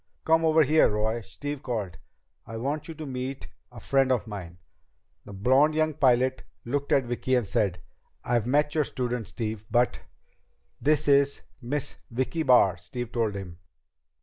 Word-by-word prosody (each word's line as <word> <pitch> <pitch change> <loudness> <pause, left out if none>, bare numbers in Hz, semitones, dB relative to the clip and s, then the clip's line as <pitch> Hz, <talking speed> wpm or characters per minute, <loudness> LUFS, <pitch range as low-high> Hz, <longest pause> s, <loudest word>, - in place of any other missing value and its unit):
"Come 160 0 +4
over 160 0 +5
here, 155 +3 +4
Roy," 110 +2 -1
Steve 135 +9 -6
called. 105 -9 -4 0.5
"I 115 - -6
want 140 +6 -3
you 165 - -7
to 155 0 -7
meet 130 0 -5 0.2
a - - -11
friend 135 -1 +2
of 125 -4 +1
mine." 90 -6 -8 0.7
The - - -10
blond 130 +10 +3
young 155 0 +1
pilot 130 -1 +2 0.2
looked 140 +4 -2
at 135 - +4
Vicki 120 +2 -1
as 120 -6 0
he - - -9
said, 95 -5 0 0.4
"I've 120 -2 0
met 150 +3 +2
your 155 - +2
student, 125 -4 -3
Steve, 110 -2 -4
but 120 +2 +1 0.4
..." - - -43
"This 150 +1 +2
is 140 0 +3 0.2
Miss 135 +3 -3
Vicki 130 +7 -2
Barr," 120 - +5
Steve 120 +5 -7
told 115 -4 -1
him. 90 -3 -8
125 Hz, 170 wpm, -27 LUFS, 110-145 Hz, 0.7 s, over